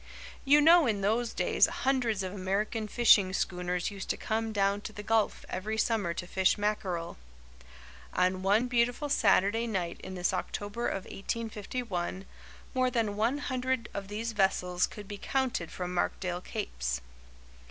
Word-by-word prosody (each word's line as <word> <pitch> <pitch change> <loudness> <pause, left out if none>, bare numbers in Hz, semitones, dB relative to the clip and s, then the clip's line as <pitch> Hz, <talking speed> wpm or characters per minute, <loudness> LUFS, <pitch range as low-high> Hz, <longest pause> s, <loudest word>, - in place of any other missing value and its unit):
You 290 +2 +6
know 330 -1 +7
in 210 -3 0
those 225 +4 +1
days - - +3
hundreds 245 -7 0
of 185 0 -4
American 205 +3 -1
fishing 205 -4 +5
schooners 180 0 -1
used 195 -1 -7
to - - 0
come 225 0 -2
down 200 -1 +1
to 215 - -6
the 210 -1 -8
Gulf 220 0 +1
every 215 +4 -3
summer 220 -5 +1
to 175 - -4
fish 190 +3 +2
mackerel. 195 -5 -2 1.0
On 185 0 +1
one 205 +5 +3
beautiful 245 +4 +1
Saturday 225 -4 +3
night 180 -6 -3
in 190 - -6
this 180 -1 0
October 205 +4 -3
of 195 - -2
1851, 210 -3 -4 0.5
more 255 -1 +2
than 225 -4 0
one 230 +6 +1
hundred 260 -4 -2
of 200 -1 -5
these 220 +3 -3
vessels 180 -3 +1
could 210 -2 -10
be 205 0 -7
counted 260 -11 -1
from 180 0 -4
Markdale 180 0 -1
Capes. - - -3
205 Hz, 155 wpm, -30 LUFS, 185-230 Hz, 1.0 s, know